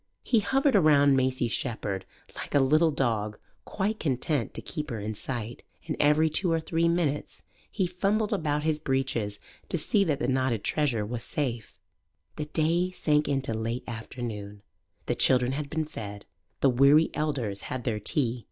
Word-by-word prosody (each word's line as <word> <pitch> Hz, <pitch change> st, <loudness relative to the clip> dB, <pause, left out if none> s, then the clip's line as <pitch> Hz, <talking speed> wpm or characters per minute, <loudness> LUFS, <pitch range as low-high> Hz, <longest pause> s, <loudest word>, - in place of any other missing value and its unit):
He 235 Hz, -, +3 dB
hovered 270 Hz, +5 st, +2 dB
around 145 Hz, -6 st, +5 dB
Maisie 130 Hz, -2 st, +1 dB
Shepherd 110 Hz, -5 st, -2 dB, 0.3 s
like -, -, -6 dB
a -, -, +6 dB
little 155 Hz, +5 st, +4 dB
dog 110 Hz, -7 st, -1 dB, 0.3 s
quite 210 Hz, +2 st, -2 dB
content 135 Hz, -2 st, 0 dB
to -, -, -5 dB
keep 150 Hz, -3 st, -5 dB
her 115 Hz, -4 st, -4 dB
in 105 Hz, +2 st, -3 dB
sight. 120 Hz, +1 st, -5 dB, 0.2 s
And 155 Hz, -, -2 dB
every 150 Hz, +2 st, +4 dB
two 165 Hz, +3 st, +1 dB
or 165 Hz, -, +2 dB
three 165 Hz, +1 st, 0 dB
minutes 160 Hz, -4 st, -1 dB, 0.3 s
he 195 Hz, -, 0 dB
fumbled 200 Hz, +5 st, 0 dB
about 150 Hz, -6 st, 0 dB
his 155 Hz, -1 st, 0 dB
breeches 130 Hz, -7 st, -1 dB, 0.3 s
to -, -, +1 dB
see 200 Hz, +6 st, +2 dB
that 150 Hz, -5 st, +1 dB
the 120 Hz, -, -2 dB
knotted 130 Hz, -4 st, 0 dB
treasure 130 Hz, -9 st, 0 dB
was 115 Hz, +2 st, -4 dB
safe. 120 Hz, -4 st, -4 dB, 0.6 s
The 150 Hz, -, -2 dB
day 165 Hz, +4 st, +1 dB
sank 150 Hz, -4 st, +1 dB
into 135 Hz, -4 st, 0 dB
late 115 Hz, +2 st, -3 dB
afternoon. 110 Hz, -3 st, -6 dB, 0.4 s
The -, -, 0 dB
children 125 Hz, 0 st, +3 dB
had 145 Hz, +1 st, -3 dB
been 160 Hz, +1 st, -1 dB
fed. 105 Hz, -8 st, -8 dB, 0.4 s
The 135 Hz, -, +5 dB
weary 140 Hz, +5 st, +5 dB
elders 135 Hz, -10 st, -2 dB
had 130 Hz, -1 st, -4 dB
their 110 Hz, -3 st, -1 dB
tea. 120 Hz, +3 st, 0 dB
140 Hz, 170 wpm, -28 LUFS, 120-155 Hz, 0.6 s, a